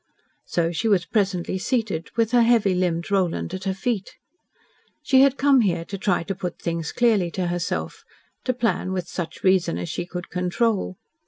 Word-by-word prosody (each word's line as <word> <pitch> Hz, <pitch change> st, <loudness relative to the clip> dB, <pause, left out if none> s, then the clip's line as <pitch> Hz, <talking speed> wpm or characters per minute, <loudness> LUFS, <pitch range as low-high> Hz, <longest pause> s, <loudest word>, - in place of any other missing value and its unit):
So 170 Hz, -1 st, 0 dB
she 200 Hz, +7 st, -1 dB
was 195 Hz, -5 st, +3 dB
presently 190 Hz, -3 st, 0 dB
seated, 205 Hz, -7 st, -1 dB
with 230 Hz, -1 st, +1 dB
her 245 Hz, -1 st, +5 dB
heavy 230 Hz, -4 st, +4 dB
limbed 180 Hz, 0 st, -1 dB
Roland 185 Hz, -2 st, 0 dB
at 190 Hz, +1 st, -5 dB
her 190 Hz, -, 0 dB
feet. 205 Hz, -1 st, -2 dB, 0.9 s
She 265 Hz, -3 st, +5 dB
had 275 Hz, 0 st, +4 dB
come 275 Hz, -2 st, +5 dB
here 170 Hz, -5 st, 0 dB
to 200 Hz, -, -6 dB
try 195 Hz, -4 st, +1 dB
to 195 Hz, -, -3 dB
put 180 Hz, -2 st, -5 dB
things 165 Hz, -2 st, -3 dB
clearly 215 Hz, -7 st, +2 dB
to 180 Hz, +1 st, -2 dB
herself, 175 Hz, -1 st, -3 dB, 0.4 s
to 255 Hz, -, +1 dB
plan 230 Hz, -6 st, 0 dB
with 180 Hz, -2 st, -3 dB
such 165 Hz, -3 st, -6 dB
reason 185 Hz, -, +3 dB
as 90 Hz, 0 st, -4 dB
she 175 Hz, -, -4 dB
could 180 Hz, 0 st, -7 dB
control. 185 Hz, +2 st, 0 dB
190 Hz, 180 wpm, -24 LUFS, 175-225 Hz, 0.9 s, her